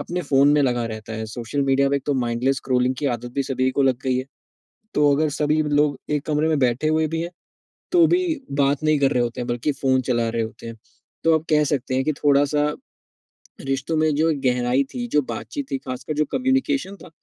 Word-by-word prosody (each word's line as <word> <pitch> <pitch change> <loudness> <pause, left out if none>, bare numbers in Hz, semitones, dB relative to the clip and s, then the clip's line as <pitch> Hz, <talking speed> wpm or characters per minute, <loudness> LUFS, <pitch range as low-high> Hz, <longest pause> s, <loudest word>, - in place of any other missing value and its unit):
अपने 180 +1 -3
फ़ोन 140 -2 +4
में 145 - +3
लगा 120 -3 +1
रहता 110 +1 -8
है 110 0 -4
सोशल 120 +4 -3
मीडिया 135 0 +2
में 140 - +2
एक 135 - -5
तो 145 - +1
माइंडलेस 120 +3 0
स्क्रोलिंग 125 0 0
की 145 - -1
आदत 120 +1 -10
भी 140 - +1
सभी 130 -1 0
को 140 - 0
लग 130 -2 +2
गई 130 -1 +1
है। 130 - -3 0.7
तो 145 -1 +4
अगर 155 +1 +1
सभी 150 +1 +2
लोग 145 -2 +1 0.2
एक 140 - -12
कमरे 155 +1 +1
में 155 - +1
बैठे 130 +3 +1
हुए 155 0 +2
भी - - -1
हैं 170 - -5 0.6
तो 345 -2 +6
भी 365 - 0 0.4
बात 140 +2 +1
नहीं 155 -1 +3
कर 135 -1 +3
रहे 125 - +2
होते 120 0 -3
हैं 120 - -4
बल्कि 120 +5 -1
फ़ोन 130 -1 +3
चला 120 -1 +1
रहे 115 0 -1
होते 110 +1 -7
हैं। 115 - -8 0.5
तो 165 -1 +5
अब 160 - -13
कह 150 -1 +4
सकते 130 -1 -3
हैं 135 - +1
कि 155 - +1
थोड़ा-सा 145 +1 +3 0.9
रिश्तों 135 +4 -2
में 155 - +3
जो 160 +2 +2
एक 140 -3 -3
गहराई 125 +2 +2
थी 240 -1 -3
जो - - +5
बातचीत 130 +6 -6
थी 135 - 0
खासकर 130 +4 -4
जो - - +3
कम्युनिकेशन 265 -4 0
था - - -12
140 Hz, 230 wpm, -22 LUFS, 125-150 Hz, 0.9 s, तो